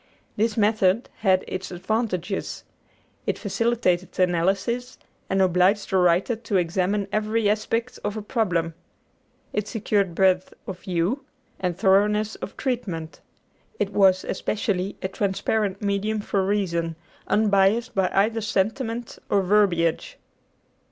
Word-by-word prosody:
This 220 Hz, +1 st, 0 dB
method 210 Hz, 0 st, +2 dB
had 190 Hz, -3 st, +2 dB
its 185 Hz, 0 st, -5 dB
advantages. 195 Hz, 0 st, -2 dB, 0.6 s
It -, -, 0 dB
facilitated 200 Hz, -4 st, 0 dB
analysis, 195 Hz, +8 st, 0 dB, 0.3 s
and 190 Hz, 0 st, +3 dB
obliged 185 Hz, +3 st, +2 dB
the 190 Hz, -, +3 dB
writer 180 Hz, +6 st, +3 dB
to 225 Hz, -3 st, -1 dB
examine 185 Hz, +3 st, 0 dB
every 215 Hz, +1 st, +1 dB
aspect 230 Hz, +3 st, -1 dB
of 205 Hz, +1 st, -2 dB
a 215 Hz, -, -5 dB
problem. 180 Hz, -8 st, 0 dB, 0.8 s
It 210 Hz, 0 st, -1 dB
secured 200 Hz, -5 st, 0 dB
breadth 185 Hz, -1 st, +2 dB
of 185 Hz, -2 st, -6 dB
view 185 Hz, +8 st, -1 dB, 0.4 s
and 180 Hz, -2 st, -2 dB
thoroughness 210 Hz, +2 st, +3 dB
of -, -, -8 dB
treatment. 190 Hz, -, -3 dB, 0.6 s
It 200 Hz, -, -1 dB
was, 190 Hz, -2 st, +4 dB
especially, 200 Hz, -1 st, -2 dB
a -, -, +1 dB
transparent 200 Hz, +1 st, -1 dB
medium 205 Hz, +2 st, 0 dB
for 200 Hz, -1 st, 0 dB
reason, 170 Hz, -5 st, -1 dB, 0.3 s
unbiased 215 Hz, +3 st, +3 dB
by 190 Hz, -2 st, +2 dB
either 220 Hz, +3 st, +2 dB
sentiment 225 Hz, +3 st, -2 dB
or 200 Hz, -1 st, +3 dB
verbiage. 195 Hz, -, +2 dB
200 Hz, 120 wpm, -24 LUFS, 185-220 Hz, 0.8 s, was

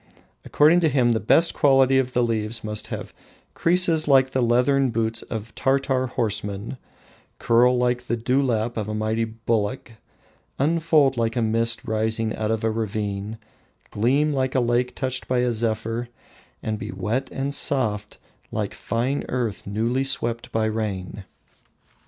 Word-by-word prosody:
According 155 Hz, +4 st, +4 dB
to 165 Hz, -3 st, +2 dB
him 130 Hz, -4 st, +2 dB
the 110 Hz, -, +1 dB
best 165 Hz, +10 st, +3 dB
quality 135 Hz, -2 st, +4 dB
of 130 Hz, -1 st, -2 dB
the 125 Hz, -, +2 dB
leaves 110 Hz, -1 st, -2 dB
must 105 Hz, -1 st, -3 dB
have -, -, -6 dB, 0.4 s
"creases 170 Hz, -2 st, +2 dB
like 135 Hz, -2 st, +4 dB
the 130 Hz, -, 0 dB
leathern 125 Hz, +3 st, +3 dB
boot 115 Hz, -1 st, -1 dB
of 110 Hz, -1 st, -6 dB
Tartar 135 Hz, -1 st, +1 dB
horsemen, 105 Hz, 0 st, -3 dB, 0.6 s
curl 125 Hz, +2 st, +3 dB
like 125 Hz, 0 st, +1 dB
the 120 Hz, -1 st, -2 dB
dewlap 120 Hz, -2 st, 0 dB
of 105 Hz, -1 st, -3 dB
a 105 Hz, -, -3 dB
mighty 110 Hz, +1 st, 0 dB
bullock, 115 Hz, +1 st, -2 dB, 0.7 s
unfold 155 Hz, -2 st, +2 dB
like 115 Hz, -1 st, 0 dB
a 120 Hz, -, +1 dB
mist 115 Hz, +1 st, +1 dB
rising 110 Hz, 0 st, -1 dB
out 110 Hz, -1 st, -2 dB
of 110 Hz, -1 st, -1 dB
a 110 Hz, -, +1 dB
ravine, 105 Hz, -1 st, -3 dB, 0.5 s
gleam 140 Hz, +8 st, +1 dB
like 130 Hz, -1 st, -1 dB
a -, -, +4 dB
lake 120 Hz, +1 st, 0 dB
touched 130 Hz, -1 st, -2 dB
by 130 Hz, -, 0 dB
a 125 Hz, -1 st, +1 dB
zephyr, 115 Hz, +1 st, -2 dB, 0.5 s
and 110 Hz, -1 st, -3 dB
be 110 Hz, -2 st, -6 dB
wet 105 Hz, +8 st, -2 dB
and 140 Hz, +1 st, -3 dB
soft 105 Hz, -8 st, 0 dB, 0.3 s
like -, -, -3 dB
fine 125 Hz, +5 st, -2 dB
earth 120 Hz, -7 st, -3 dB
newly 115 Hz, +6 st, 0 dB
swept 120 Hz, -3 st, -1 dB
by 110 Hz, -1 st, 0 dB
rain." 105 Hz, -3 st, -4 dB
115 Hz, 150 wpm, -23 LUFS, 110-130 Hz, 0.7 s, According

